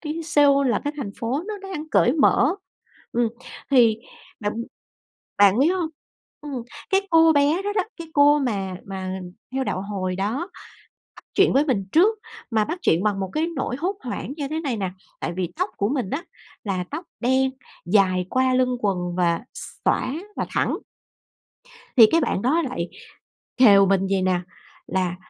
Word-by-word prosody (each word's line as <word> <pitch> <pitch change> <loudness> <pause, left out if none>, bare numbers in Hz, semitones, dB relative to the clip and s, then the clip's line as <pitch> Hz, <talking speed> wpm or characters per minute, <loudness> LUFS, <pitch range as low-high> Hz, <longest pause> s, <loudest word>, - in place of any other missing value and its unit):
cái 315 +1 -4
Seoul, 285 -3 +4
là 240 - +1
cái 290 - -1
thành 255 -9 -4
phố 250 +7 -1
nó 430 - -4
đang 315 -5 -6
cởi 245 - +4
mở. 295 0 +3 0.6
Ừm, 235 -1 +2 0.4
thì 230 -5 +5 0.4
bạn 205 -1 -1 0.9
bạn 200 +1 +6
biết 290 - +5
hông? 350 -4 -1 0.5
Ừm, 280 -5 -5 0.3
cái 390 0 +2
cô 325 -1 +6
bé 295 +5 +2
đó 410 +1 -2
đó, 405 -2 +1
cái 335 -2 -8
cô 290 0 +6
mà 200 -9 -2
mà 190 -1 -5 0.3
theo 265 0 -1
đạo 190 - -2
Hồi 190 -2 -3
đó 205 +5 -1 0.8
bắt - - -15
chuyện 395 0 +4
với 280 +3 +4
mình 205 -9 0
trước, 420 +7 +4 0.3
mà 220 -2 +2
bắt 330 +10 -4
chuyện 165 +3 +3
bằng 205 -2 0
một 190 -1 -3
cái 315 +2 +1
nỗi 255 -1 -2
hốt 370 +6 -2
hoảng 250 +1 -5
như 285 -3 -3
thế 315 +2 -2
này 275 -8 -2
nè, 190 -3 -2 0.3
tại 170 - -3
vì 180 -1 -3
tóc 365 +4 -1
của 200 - 0
mình 250 -7 -2
á 295 - -2 0.4
là 190 -3 -2
tóc 315 +5 -5 0.2
đen 260 +2 +2 0.4
dài 185 -1 +3
qua 260 0 +2
lưng 255 -1 +2
quần 180 -4 -1
và 170 -2 +2 0.4
xõa - - +1 0.2
và - - -2
thẳng. - - 0 1.2
Thì 230 - +11
cái 330 - +4
bạn 195 - 0
đó 295 +9 +2
lại 250 - -3 0.7
khều 200 -6 +7
mình 195 0 +2
vầy 195 -1 +1
nè, 185 -1 +1 0.5
là 185 -2 -1
250 Hz, 180 wpm, -23 LUFS, 195-300 Hz, 1.2 s, Thì